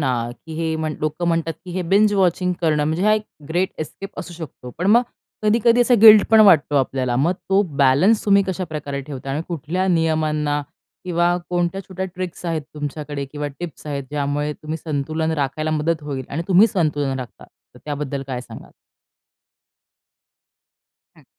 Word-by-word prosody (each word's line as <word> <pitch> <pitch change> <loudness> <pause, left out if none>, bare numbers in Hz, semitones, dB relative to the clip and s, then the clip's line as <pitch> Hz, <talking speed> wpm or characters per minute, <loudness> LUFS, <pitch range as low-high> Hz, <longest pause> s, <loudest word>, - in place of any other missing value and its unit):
ना, 120 -4 -1 0.2
की 160 - -7
हे 160 0 -1
म्हण 155 -1 -3
लोकं 155 +3 -2
म्हणतात 165 -1 0
की 180 - -8
हे 185 +1 -2
बिंज 205 +4 +3
वॉचिंग 180 -1 +2
करणं 155 -3 +2
म्हणजे 160 +5 -1
हा 215 - +5
एक 215 - -1 0.3
ग्रेट 175 +3 0
एस्केप 195 +5 -7
असू 175 - -6
शकतो. 155 -6 -9
पण 180 - -1
मग 230 +4 +6 0.4
कधी-कधी 230 +3 +3
असा 245 +1 +4
गिल्ट 215 -2 +9
पण 220 -1 +7
वाटतो 170 -8 +5
आपल्याला. 130 -2 0
मग 155 +8 +2 0.2
तो 195 +1 +5
बॅलन्स 140 +11 +4
तुम्ही 200 -1 +5
कशा 190 0 -2
प्रकारे 150 -4 -5
ठेवता. 135 -1 -7
आणि 145 +4 -2
कुठल्या 175 +3 -2
नियमांना 155 -3 +1 0.4
किंवा 175 0 +1
कोणत्या 175 +2 0
छोट्या 190 0 -5
ट्रिक्स 180 -1 -6
आहेत 160 -3 -1
तुमच्याकडे 145 -1 -5
किंवा 150 0 -3
टिप्स 170 -3 -8
आहेत. 140 -2 -3
ज्यामुळे 145 0 -1
तुम्ही 155 +1 -6
संतुलन 155 +1 -1
राखायला 155 +3 -2
मदत 155 +1 0
होईल. 140 -3 -5
आणि 160 +4 -3
तुम्ही 190 +3 +6
संतुलन 145 -9 -1
राखता. 125 -2 -9 0.3
तर - - -14
त्याबद्दल 145 -2 -4
काय 130 -2 -4
सांगाल? 125 - -12 2.4
हं. - - -20
160 Hz, 170 wpm, -21 LUFS, 145-185 Hz, 2.4 s, गिल्ट